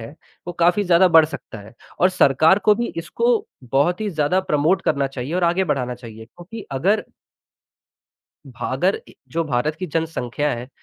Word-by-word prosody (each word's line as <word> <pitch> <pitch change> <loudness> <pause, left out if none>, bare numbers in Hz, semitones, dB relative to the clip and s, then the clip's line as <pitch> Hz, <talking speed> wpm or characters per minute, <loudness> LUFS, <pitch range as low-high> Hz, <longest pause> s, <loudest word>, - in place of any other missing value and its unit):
है, 115 +6 -10 0.3
वो 175 - -4
काफ़ी 175 +4 +2
ज़्यादा 180 0 +5
बढ़ 165 -2 +6
सकता 150 -7 -8
है। 110 - -15 0.3
और 180 - +5
सरकार 160 +2 +4
को 210 - +5
भी 235 +1 -2
इसको 455 - 0 0.3
बहुत 175 +7 +2
ही 215 - -2
ज़्यादा 160 +3 +1
प्रमोट 165 +1 +1
करना 140 -1 0
चाहिए 135 +3 -6
और 180 -1 +1
आगे 175 +3 +2
बढ़ाना 130 -6 -2
चाहिए, 115 -2 -11
क्योंकि 175 - -11
अगर 190 +11 +1 1.4
भारत 445 - -2
ए - - -17 0.2
जो 165 0 0
भारत 150 +2 -1
की 185 - -5
जनसंख्या 150 -3 -2
है, 120 +2 -8
165 Hz, 170 wpm, -21 LUFS, 135-185 Hz, 1.4 s, बढ़